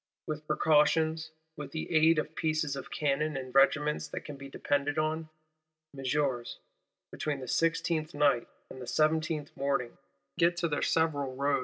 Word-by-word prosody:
—With 150 0 -5
precautions, 155 +1 +3 0.3
with 145 -3 -8
the 160 +1 -3
aid 160 +1 +5
of 155 +1 -2
pieces 155 -3 0
of 135 - -7
cannon 150 0 0
and 130 -1 -6
regiments 150 +2 +3
that - - -5
can 150 - -7
be 140 0 -10
depended 145 +2 -1
on, 155 +1 -1 0.7
Messeigneurs, 135 -2 -1 0.5
between 150 -2 -3
the 130 - -6
16th 165 0 0
night 145 -5 +3 0.2
and 130 - -9
the - - -6
17th 155 +1 0
morning, 135 -3 -1 0.4
get 170 0 +3
to 175 -1 +1
their 145 -2 -1
several 145 -5 +1
roads. 140 +1 +1
150 Hz, 155 wpm, -30 LUFS, 140-155 Hz, 0.7 s, aid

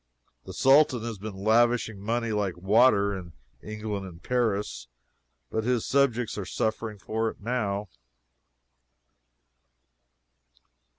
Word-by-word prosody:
The - - -8
Sultan 135 -2 +4
has 115 -4 -5
been 105 0 -6
lavishing 115 -1 +2
money 115 +3 -1
like 100 -4 -1
water 100 +1 +4
in 90 -3 -8 0.3
England 105 -2 -5
and 85 -1 -13
Paris, 105 - -1 0.6
but 110 - -1
his 125 -1 0
subjects 125 -6 +1
are - - -3
suffering 110 +2 -2
for 110 +3 -2
it - - -11
now. 105 -3 -2
110 Hz, 110 wpm, -27 LUFS, 100-120 Hz, 0.6 s, Sultan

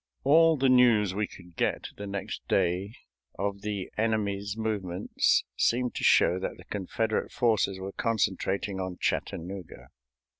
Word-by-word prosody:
All 160 +3 +5
the 135 0 +2
news 120 -6 +5
we 105 +1 -1
could 90 -2 -15
get - - -1
the 100 - -7
next 100 -1 -5
day 95 +3 0 0.4
of 100 +1 -2
the 105 -2 -4
enemy's 105 -2 -1
movements 100 -5 0
seemed 125 +1 +1
to - - -5
show 90 - +5
that 95 - -4
the - - -13
Confederate 110 +3 -2
forces 110 -5 +1
were 95 +1 -5
concentrating 100 -2 -1
on 95 -1 -4
Chattanooga. 90 +1 -4
100 Hz, 140 wpm, -28 LUFS, 95-110 Hz, 0.4 s, All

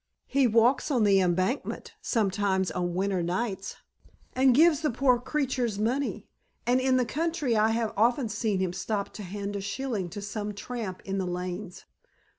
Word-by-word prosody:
"He 275 -1 +3
walks 235 +6 +3
on 250 -6 +2
the 200 -2 +5
Embankment 185 +8 -1
sometimes 195 -4 +1
on 175 +1 -2
winter 190 -1 0
nights 190 +3 -2 0.6
and 260 -1 +4
gives 315 0 +5
the 305 - +1
poor 250 0 +3
creatures 250 -5 -1
money. 245 +7 -1 0.4
And 250 +2 +3
in 260 0 +3
the 250 - +2
country 310 -2 -1
I 215 +1 +4
have 225 -1 0
often 235 +4 +2
seen 215 -2 -1
him 180 -2 -1
stop 200 +2 -3
to - - -8
hand 200 +1 -5
a 200 - -3
shilling 200 -2 -3
to 190 - -7
some 205 0 -4
tramp 215 -4 -5
in 195 0 -2
the 185 - -2
lanes." 180 +1 -5
215 Hz, 170 wpm, -28 LUFS, 190-250 Hz, 0.6 s, the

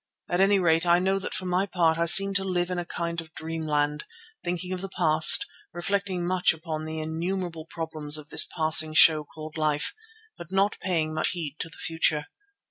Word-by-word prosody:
At 175 - 0
any 200 +1 +4
rate 165 -3 +2
I 170 0 +5
know 190 +2 0
that 195 - -5
for 185 - -4
my 180 +2 0
part 165 -3 +1
I 170 - +2
seemed 195 +3 +5
to 195 - -4
live 180 -1 -2
in 180 - -2
a 175 - -4
kind 170 -1 -4
of 160 -1 -17
dreamland, 150 -2 -2 0.4
thinking 180 +1 -4
of 185 - -5
the 195 - -6
past, 160 - +4 0.3
reflecting 190 0 -2
much 180 0 +2
upon 155 -1 -6
the 160 0 -5
innumerable 165 +1 -4
problems 155 -3 -3
of 150 -1 -12
this - - +6
passing 155 -1 +4
show 155 -1 +6
called 155 +1 -10
life, 150 - 0 0.5
but 170 0 -10
not 195 +2 +1
paying 160 -4 -1
much 155 - -1
heed 155 -4 -6
to 165 - -5
the 160 - -15
future. 160 -2 0
165 Hz, 200 wpm, -26 LUFS, 155-180 Hz, 0.5 s, this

